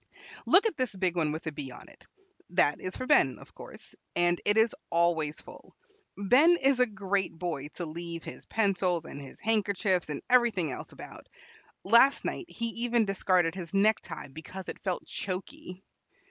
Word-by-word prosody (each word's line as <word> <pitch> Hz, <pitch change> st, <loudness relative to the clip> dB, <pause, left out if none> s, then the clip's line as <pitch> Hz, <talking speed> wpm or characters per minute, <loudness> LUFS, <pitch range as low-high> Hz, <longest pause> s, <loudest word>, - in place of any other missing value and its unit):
"Look 395 Hz, -, +6 dB
at 445 Hz, -, +1 dB
this 255 Hz, -6 st, -2 dB
big 185 Hz, -2 st, 0 dB
one 160 Hz, -3 st, +1 dB
with 155 Hz, +2 st, -5 dB
a 160 Hz, -, -2 dB
B 140 Hz, -2 st, -6 dB
on 125 Hz, -, -12 dB
it; -, -, -19 dB, 0.4 s
that 170 Hz, -4 st, +2 dB
is 185 Hz, -, -4 dB
for 255 Hz, -, -4 dB
Ben, 135 Hz, -, +4 dB
of -, -, -16 dB
course, -, -, -11 dB, 0.2 s
and 175 Hz, 0 st, +2 dB
it 205 Hz, +1 st, +3 dB
is 225 Hz, +4 st, +3 dB
always 165 Hz, -3 st, +1 dB
full. -, -, -14 dB, 0.4 s
Ben 260 Hz, -, +5 dB
is 270 Hz, -4 st, +2 dB
a 250 Hz, -, +4 dB
great 195 Hz, -4 st, -2 dB
boy 165 Hz, -5 st, -4 dB
to 175 Hz, -, -4 dB
leave 170 Hz, +1 st, -5 dB
his -, -, -9 dB
pencils, 185 Hz, -6 st, +1 dB
and 140 Hz, -, -8 dB
his 135 Hz, -, -11 dB
handkerchiefs, 200 Hz, -5 st, 0 dB
and 150 Hz, -, -5 dB
everything 230 Hz, -, +3 dB
else -, -, -7 dB
about. -, -, -11 dB, 0.6 s
Last 235 Hz, +7 st, +5 dB
night 365 Hz, -, -3 dB
he 230 Hz, 0 st, 0 dB
even 235 Hz, 0 st, +1 dB
discarded 185 Hz, -4 st, +1 dB
his 180 Hz, -1 st, -7 dB
necktie 205 Hz, -6 st, +1 dB
because 170 Hz, +6 st, -9 dB
it -, -, -7 dB
felt 185 Hz, -3 st, -3 dB
choky. 185 Hz, -1 st, -6 dB
185 Hz, 175 wpm, -29 LUFS, 170-220 Hz, 0.6 s, Look